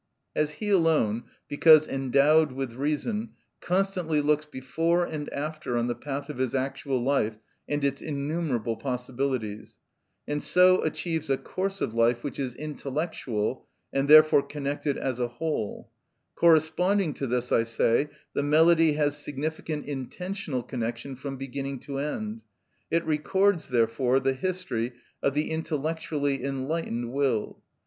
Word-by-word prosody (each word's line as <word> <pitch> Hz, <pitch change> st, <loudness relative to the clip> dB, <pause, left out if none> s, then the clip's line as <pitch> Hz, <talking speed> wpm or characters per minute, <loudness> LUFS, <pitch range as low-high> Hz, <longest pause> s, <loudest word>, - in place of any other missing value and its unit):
As 150 Hz, 0 st, +1 dB
he 210 Hz, +4 st, -4 dB
alone, 155 Hz, -, +2 dB, 0.2 s
because 155 Hz, +1 st, +6 dB
endowed 140 Hz, +3 st, +3 dB
with 130 Hz, -2 st, -4 dB
reason, 155 Hz, -, -2 dB, 0.3 s
constantly 180 Hz, -4 st, 0 dB
looks 150 Hz, +1 st, +2 dB
before 165 Hz, +5 st, 0 dB
and 150 Hz, -3 st, -5 dB
after 150 Hz, -4 st, -3 dB
on 120 Hz, -, +1 dB
the 120 Hz, -, 0 dB
path 140 Hz, +3 st, -5 dB
of 150 Hz, -4 st, -7 dB
his 130 Hz, -1 st, 0 dB
actual 135 Hz, 0 st, -1 dB
life 120 Hz, -5 st, +1 dB, 0.3 s
and 145 Hz, -1 st, -1 dB
its 140 Hz, 0 st, 0 dB
innumerable 140 Hz, -6 st, -2 dB
possibilities, 125 Hz, -4 st, -3 dB, 0.5 s
and 145 Hz, 0 st, -1 dB
so 185 Hz, 0 st, +5 dB
achieves 160 Hz, 0 st, -2 dB
a 135 Hz, -, +3 dB
course 195 Hz, +5 st, -4 dB
of 110 Hz, -, -1 dB
life 115 Hz, +1 st, +2 dB
which 145 Hz, -, -5 dB
is 130 Hz, -3 st, -3 dB
intellectual, 140 Hz, -6 st, -3 dB, 0.3 s
and 135 Hz, +1 st, +1 dB
therefore 155 Hz, -1 st, +8 dB
connected 145 Hz, 0 st, -3 dB
as 130 Hz, -2 st, -2 dB
a 120 Hz, -, +1 dB
whole; 120 Hz, -3 st, -4 dB, 0.4 s
corresponding 170 Hz, +2 st, +3 dB
to 135 Hz, -, -4 dB
this, 125 Hz, +1 st, -1 dB
I -, -, +5 dB
say, 115 Hz, +4 st, +1 dB, 0.2 s
the -, -, 0 dB
melody 160 Hz, +2 st, +5 dB
has 145 Hz, -1 st, +1 dB
significant 150 Hz, +1 st, -4 dB
intentional 145 Hz, +1 st, -4 dB
connection 120 Hz, +2 st, -4 dB
from 135 Hz, +1 st, -6 dB
beginning 135 Hz, +1 st, -4 dB
to 140 Hz, -1 st, -5 dB
end. 215 Hz, +10 st, -3 dB, 0.5 s
It 165 Hz, 0 st, +1 dB
records, 175 Hz, +3 st, +1 dB
therefore, 120 Hz, +2 st, +2 dB
the 135 Hz, 0 st, +1 dB
history 130 Hz, -7 st, -2 dB, 0.3 s
of 140 Hz, -, +1 dB
the 150 Hz, +2 st, 0 dB
intellectually 155 Hz, -3 st, -2 dB
enlightened 135 Hz, -3 st, -2 dB
will. 135 Hz, -6 st, 0 dB
145 Hz, 140 wpm, -27 LUFS, 130-160 Hz, 0.5 s, therefore